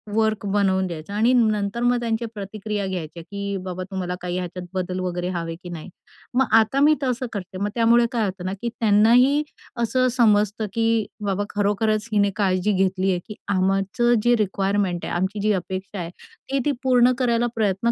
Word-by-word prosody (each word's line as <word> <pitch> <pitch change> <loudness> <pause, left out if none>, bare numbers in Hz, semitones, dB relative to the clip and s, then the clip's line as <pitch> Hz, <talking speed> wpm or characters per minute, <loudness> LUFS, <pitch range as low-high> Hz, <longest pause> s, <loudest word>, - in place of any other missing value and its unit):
Work 220 -1 +1
बनवून 195 -2 +1
द्यायचा 170 +2 -7
आणि 225 +4 +3
नंतर 215 -2 +1
मग 245 0 +3
त्यांच्या 230 0 -2
प्रतिक्रिया 205 0 -4
घ्यायच्या 170 -3 -5
की, 200 +2 -4
"बाबा, 185 0 -4
तुम्हाला 180 -2 -3
काही 180 0 -3
ह्याच्यात 180 0 -5
बदल 185 0 -2
वगैरे 180 -1 -2
हवे 165 -1 -3
की 175 - -8
नाही." 170 +1 -7 0.4
मग 265 +2 +3
आता 225 +5 +1
मी 300 +2 +5
तसं 255 0 -1
करते. 190 -2 -6
मग 200 +2 -1
त्यामुळे 235 0 +4
काय 230 -3 0
होतं 185 -2 -5
ना 185 - -2
की 235 - -1
त्यांनाही 235 +7 +4 0.4
असं 255 +2 +2
समजतं 215 -2 +3
की 225 -1 +1 0.2
बाबा 200 0 0
खरोखरच 210 +2 0
हिने 200 -1 +3
काळजी 190 -1 +1
घेतली 190 0 +1
आहे 180 - 0
की 210 - -8 0.2
आमचं 195 +6 +2
जे 240 0 +4
रिक्वायरमेंट 195 -2 0
आहे - - -4
आमची 190 +4 -1
जी 215 +1 +2
अपेक्षा 190 +1 -4
आहे 170 -1 -4 0.4
ते 275 - +1
ती 295 - +3
पूर्ण 250 -1 +4
करायला 240 -1 +2
प्रयत्न 215 +1 +1
205 Hz, 180 wpm, -23 LUFS, 185-230 Hz, 0.4 s, मी